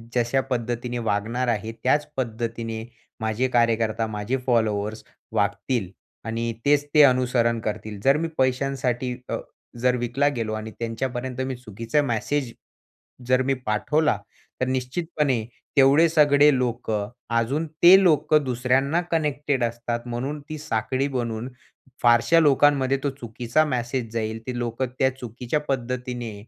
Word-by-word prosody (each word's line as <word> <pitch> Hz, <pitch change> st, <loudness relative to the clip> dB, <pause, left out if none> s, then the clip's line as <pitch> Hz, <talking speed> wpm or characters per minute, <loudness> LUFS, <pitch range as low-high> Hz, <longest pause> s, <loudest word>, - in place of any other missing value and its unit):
जशा 120 Hz, +2 st, +2 dB
पद्धतीने 120 Hz, 0 st, -2 dB
वागणार 115 Hz, +3 st, -1 dB
आहे, 110 Hz, -1 st, -1 dB
त्याच 145 Hz, +3 st, +2 dB
पद्धतीने 115 Hz, -2 st, -3 dB, 0.4 s
माझे 110 Hz, +4 st, 0 dB
कार्यकर्ता, 115 Hz, -2 st, +1 dB
माझे 110 Hz, +4 st, -2 dB
फॉलोअर्स 110 Hz, -3 st, 0 dB, 0.3 s
वागतील 115 Hz, -8 st, -1 dB, 0.4 s
आणि 115 Hz, +1 st, -2 dB
तेच 145 Hz, 0 st, +3 dB
ते 150 Hz, -, +7 dB
अनुसरण 125 Hz, -3 st, +3 dB
करतील. 105 Hz, -1 st, -5 dB
जर 135 Hz, +2 st, +5 dB
मी 165 Hz, -, -1 dB
पैशांसाठी 130 Hz, -1 st, 0 dB
अ, -, -, -1 dB, 0.4 s
जर 125 Hz, 0 st, +3 dB
विकला 120 Hz, +4 st, 0 dB
गेलो 110 Hz, -2 st, -2 dB
आणि 110 Hz, 0 st, -5 dB
त्यांच्यापर्यंत 125 Hz, +2 st, -3 dB
मी 130 Hz, -, -3 dB
चुकीचा 115 Hz, +4 st, -2 dB
मॅसेज 130 Hz, +1 st, -1 dB, 0.8 s
जर 130 Hz, 0 st, +3 dB
मी 135 Hz, +1 st, +1 dB
पाठवला, 150 Hz, +5 st, +1 dB, 0.4 s
तर 130 Hz, -, +1 dB
निश्चितपणे 130 Hz, -1 st, -1 dB, 0.3 s
तेवढे 140 Hz, +5 st, +6 dB
सगळे 145 Hz, -2 st, +5 dB
लोकं, 115 Hz, -4 st, -2 dB, 0.3 s
अजून 135 Hz, +8 st, 0 dB, 0.2 s
ते 190 Hz, +3 st, +9 dB
लोकं 155 Hz, -3 st, +4 dB
दुसऱ्यांना 130 Hz, +5 st, +1 dB
कनेक्टेड 145 Hz, -4 st, 0 dB
असतात, 120 Hz, 0 st, -2 dB
म्हणून 130 Hz, +5 st, -3 dB
ती 155 Hz, -, -4 dB
साखळी 130 Hz, +1 st, -1 dB
बनून 120 Hz, -2 st, -3 dB, 0.5 s
फारशा 120 Hz, +7 st, +5 dB
लोकांमध्ये 140 Hz, -2 st, +4 dB
तो 140 Hz, -, +1 dB
चुकीचा 120 Hz, +5 st, 0 dB
मेसेज 120 Hz, -3 st, -2 dB
जाईल, 110 Hz, -1 st, -2 dB
ते 125 Hz, -1 st, -3 dB
लोकं 120 Hz, +2 st, -2 dB
त्या 130 Hz, -1 st, +2 dB
चुकीच्या 125 Hz, +4 st, -3 dB
पद्धतीने 125 Hz, -3 st, -3 dB
125 Hz, 130 wpm, -24 LUFS, 115-135 Hz, 0.8 s, ते